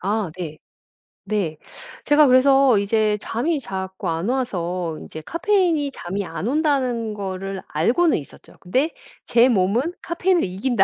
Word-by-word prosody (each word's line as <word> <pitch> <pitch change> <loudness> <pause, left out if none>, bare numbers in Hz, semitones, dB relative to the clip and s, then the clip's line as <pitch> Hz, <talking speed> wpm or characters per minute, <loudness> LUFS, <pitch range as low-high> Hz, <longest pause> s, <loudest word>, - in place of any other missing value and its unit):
아 205 -1 -1
네. 155 -4 -6 0.7
네. 195 -6 -2 0.5
제가 295 +1 +6
그래서 265 -1 +5
이제 210 +1 +1
잠이 290 +7 -1
자꾸 190 -4 -5
안 165 +4 -2
와서 180 -10 -2
인제 155 - -9
'카페인이 335 - +1
잠이 195 -4 -4
안 190 - -5
온다.'는 260 -6 0
거를 195 -1 -5
알고는 250 - +2
있었죠. 145 - -12
근데' 260 - 0 0.3
제 235 +1 +5
몸은 235 - +1
카페인을 350 +1 +1
이긴다.' 195 +4 +1
220 Hz, 270 characters per minute, -22 LUFS, 190-275 Hz, 0.7 s, 제가